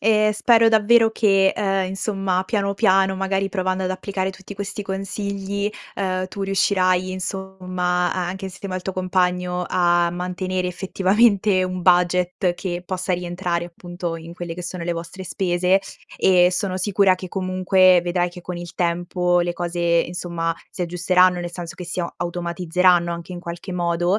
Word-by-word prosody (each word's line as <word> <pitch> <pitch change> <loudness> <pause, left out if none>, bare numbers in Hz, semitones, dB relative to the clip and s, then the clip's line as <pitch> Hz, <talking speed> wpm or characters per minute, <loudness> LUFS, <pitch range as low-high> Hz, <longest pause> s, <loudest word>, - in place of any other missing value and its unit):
Ehm, 215 0 +3
spero 225 +1 +4
davvero 225 +1 +5
che, 195 -3 +3
uhm, 195 -1 +1
insomma, 195 -1 -1
piano, 200 0 -1
piano, 190 -2 +3
magari, 195 +1 -1
provando 185 0 -1
ad 185 - -1
applicare 190 0 -2
tutti 190 +1 -11
questi 200 +1 -5
consigli, 200 +1 -3 0.2
uhm, 185 -1 -1
tu 200 +1 -6
riuscirai, 185 -1 +1
insomma, 185 -2 -2
a 180 -1 -2
anche 190 +2 -5
insieme 190 0 -7
al 185 - -4
tuo 190 - -3
compagno 180 -1 0
a 175 -1 +2
mantenere, 180 +1 -3
effettivamente, 195 +2 +2
un 185 0 -3
budget 180 +1 +2
che 175 -1 -4
possa 185 0 -2
rientrare, 175 -1 -2
appunto, 175 0 -6
in 165 +1 -10
quelle 175 -1 -6
che 180 - -7
sono 175 0 -5
le 170 +1 -1
vostre 170 +3 -7
spese 180 0 +1 0.4
e 180 -1 +5
sono 185 0 -2
sicura 195 0 +3
che, 185 0 -8
comunque, 185 0 +3
vedrai 175 0 0
che, 180 - -11
con 180 0 -6
il 175 0 -8
tempo, 175 +1 0
le 175 0 0
cose, 175 0 -4 0.3
insomma, 170 -1 -3 0.2
si 185 - -5
aggiusteranno. 180 +1 +3
Nel 175 0 -5
senso 175 -2 -7
che 180 - -7
si 175 +1 -3
a 170 - -4
automatizzeranno 175 0 +1
anche 170 +1 -7
in 180 - -6
qualche 175 +2 -7
modo. 175 +2 +1
185 Hz, 165 wpm, -22 LUFS, 175-195 Hz, 0.4 s, davvero